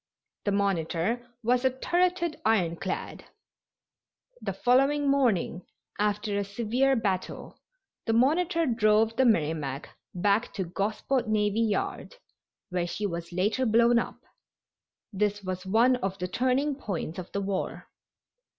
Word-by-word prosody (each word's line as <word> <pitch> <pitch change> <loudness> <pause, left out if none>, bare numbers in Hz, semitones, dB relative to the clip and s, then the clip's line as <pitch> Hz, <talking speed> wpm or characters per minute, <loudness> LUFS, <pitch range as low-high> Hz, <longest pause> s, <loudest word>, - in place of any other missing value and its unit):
The 205 - +1
Monitor 200 +4 0
was 245 +2 +2
a 260 - +4
turreted 345 +5 0
ironclad. 190 -3 -1 1.2
The - - -2
following 275 +3 +3
morning, 225 -10 +1 0.4
after 205 0 0
a - - 0
severe 235 +7 +1
battle, 195 -6 -3 0.5
the 225 - +2
Monitor 330 - +2
drove 225 -2 +3
the 260 +2 +3
Merrimac 150 - 0 0.3
back 205 +6 +1
to 195 - -1
Gosport 215 +8 -1
Navy 210 0 +1
Yard, 220 - -2 0.5
where 180 -2 -1
she 210 +4 -3
was 170 -2 -4
later 210 +8 +1
blown 235 +2 +5
up. - - -4 1.0
This 205 +1 0
was 185 0 -5
one 235 +6 +4
of 195 -4 -3
the 180 - -3
turning 260 +8 +1
points 195 - -4
of 180 - -8
the 200 - -2
war. 195 -1 -3
215 Hz, 125 wpm, -28 LUFS, 190-250 Hz, 1.2 s, blown